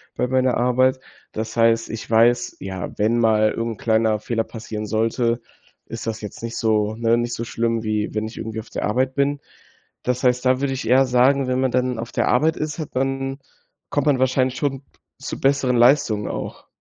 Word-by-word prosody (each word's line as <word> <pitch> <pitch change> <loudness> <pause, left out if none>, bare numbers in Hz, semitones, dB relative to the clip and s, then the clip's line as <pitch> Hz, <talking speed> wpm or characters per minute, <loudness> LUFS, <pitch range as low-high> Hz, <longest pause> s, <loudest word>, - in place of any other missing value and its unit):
bei - - 0
meiner 130 -1 +2
Arbeit. 130 +2 +2 0.3
Das 110 +1 -5
heißt, 115 0 +3
ich 110 0 -6
weiß, 120 +2 +3
ja, 95 -2 -5
wenn 110 +3 +2
mal 110 -1 +3
irgend 115 0 -3
'n - - -18
kleiner 110 -1 +2
Fehler 115 0 -1
passieren 110 -2 -6
sollte, 115 +2 0 0.5
ist 115 -1 -7
das 110 -1 -3
jetzt 105 +2 -9
nicht 115 0 -4
so 110 -1 +1
ne, 115 0 +2
nicht 120 0 -2
so 115 - -4
schlimm, 115 0 -1
wie 105 -1 -1
wenn 110 0 -2
ich 110 - -11
irgendwie 110 0 -5
auf 110 - -9
der - - -4
Arbeit 130 +5 0
bin. 140 +1 +1 0.6
Das 125 +1 -1
heißt, 125 0 +2
da 130 0 +3
würde 135 -1 0
ich 130 - -5
eher 130 +2 +5
sagen, 130 +2 +3
wenn 130 0 0
man 130 -2 +1
dann 125 -1 0
auf 115 - -6
der - - 0
Arbeit 155 +6 +2
ist, 155 +2 -4
hat 155 - -6
man 135 +1 -1 0.5
kommt 145 0 +1
man 135 -3 +3
wahrscheinlich 130 0 +1
schon 135 -1 -2 0.4
zu - - -6
besseren 135 -2 +2
Leistungen 120 -4 +3
auch. - - -6
120 Hz, 205 wpm, -22 LUFS, 110-130 Hz, 0.6 s, eher